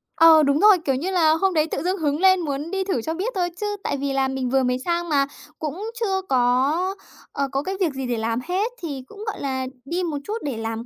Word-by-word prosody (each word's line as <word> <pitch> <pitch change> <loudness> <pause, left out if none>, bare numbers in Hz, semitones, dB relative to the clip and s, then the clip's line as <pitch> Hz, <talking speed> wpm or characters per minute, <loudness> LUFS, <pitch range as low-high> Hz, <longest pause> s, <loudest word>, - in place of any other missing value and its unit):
Ờ, 325 -1 +7
đúng 280 +1 +2
rồi, 415 -1 +7
kiểu 270 - +2
như 335 +9 -2
là, 335 -4 +4
hôm 375 +4 +1
đấy 310 -1 +2
tự - - -2
dưng 370 +2 0
hứng 295 -3 0
lên 375 0 +5
muốn 295 0 -3
đi 385 0 0
thử 375 -11 -1
cho 320 +8 -3
biết 395 +9 -3
thôi 355 -2 0
chứ - - -1 0.2
tại 280 - -1
vì 275 0 -2
là 270 0 +2
mình 265 -1 -2
vừa 265 +1 +2
mới 250 0 0
sang 345 0 -1
mà 280 -2 +3 0.3
cũng 340 +8 -4
chưa 385 -4 0
có, 255 +1 +3 0.6
ờ, 280 -1 -1
có 275 +1 -1
cái 380 +4 -3
việc 345 -7 +1
gì 265 -1 -4
để 240 -1 -1
làm 225 +1 -1
hết 390 +6 0
thì 285 -6 -5
cũng, 420 0 -10
gọi 430 - -3
là, 260 -2 -2 0.2
đi 345 +6 -2
một 320 -4 -2
chút 425 +7 -3
để 275 -6 -3
làm 225 +1 -4
305 Hz, 260 wpm, -23 LUFS, 270-370 Hz, 0.6 s, Ờ